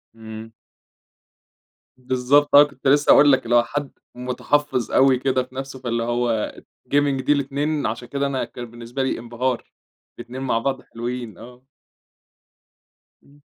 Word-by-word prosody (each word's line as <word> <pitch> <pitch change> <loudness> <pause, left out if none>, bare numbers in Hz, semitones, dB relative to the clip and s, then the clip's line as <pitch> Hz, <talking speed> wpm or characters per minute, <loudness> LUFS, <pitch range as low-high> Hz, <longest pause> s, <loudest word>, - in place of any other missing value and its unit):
إمم. 110 0 -10 1.5
بالضبط 130 +3 +2
آه، 145 - +10
كنت 140 -2 -5
لسه 145 +2 +3
هاقول 145 0 +7
لك، 130 -1 +3
اللي 120 +1 +1
هو 120 - +6
حد 145 +2 -4 0.2
متحفّظ 125 +1 -1
أوي 130 -1 +4
كده 130 -1 +1
في 130 +1 -18
نفسه، 135 0 -6
فاللي 115 -2 -2
هو 120 -2 -1 0.4
Gaming 140 -2 +2
دي - - +1
الاتنين 145 +2 -1
عشان 115 +2 -4
كده 140 +2 -1
أنا 135 -2 -2
كان 120 - -9
بالنسبة 120 +3 -5
لي 130 - -1
انبهار، 120 +1 -3 0.5
الاتنين 120 +2 -8
مع 125 -4 0
بعض 135 +1 -2
حلوين، 120 -3 -6
آه. 125 +2 -14 1.6
إمم. 145 +1 -22
130 Hz, 145 wpm, -22 LUFS, 120-140 Hz, 1.6 s, آه